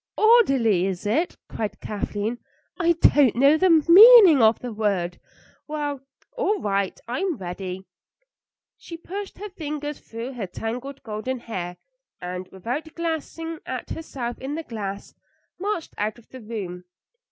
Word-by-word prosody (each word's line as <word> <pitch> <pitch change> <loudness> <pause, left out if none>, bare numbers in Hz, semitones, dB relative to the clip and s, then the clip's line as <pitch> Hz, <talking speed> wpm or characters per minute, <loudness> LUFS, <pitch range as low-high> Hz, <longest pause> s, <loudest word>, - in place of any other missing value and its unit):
"Orderly, 270 - +4
is 190 -1 -4
it?" 305 +12 0
cried 205 -2 -5
Kathleen. 210 +2 -3 0.4
"I 340 -1 +4
don't 290 -6 +4
know 275 +5 +5
the 370 +4 +3 0.2
meaning 390 - +9
of 220 0 +5
the 245 -2 -7
word. 195 -5 -1 0.5
Well, 295 -3 -3 0.3
all 430 -4 0
right, 200 - -1
I'm 310 +8 -2
ready." 185 +1 -6 0.9
She 335 - -9
pushed 390 +4 -7
her 420 +2 -7
fingers 300 -5 -5
through 230 +4 -7
her 225 -6 -5
tangled 250 +8 -6
golden 225 +3 -4
hair, 180 -6 -5 0.4
and, 180 +1 -6
without 245 - -5
glancing 330 0 -4
at 255 -1 -5
herself 250 -7 -5
in 275 +3 -4
the 325 - -4
glass, 200 -6 -6 0.5
marched 390 -3 -3
out 215 +2 -1
of 235 - -20
the 260 - -11
room. 195 -5 -6
250 Hz, 140 wpm, -24 LUFS, 205-325 Hz, 0.9 s, meaning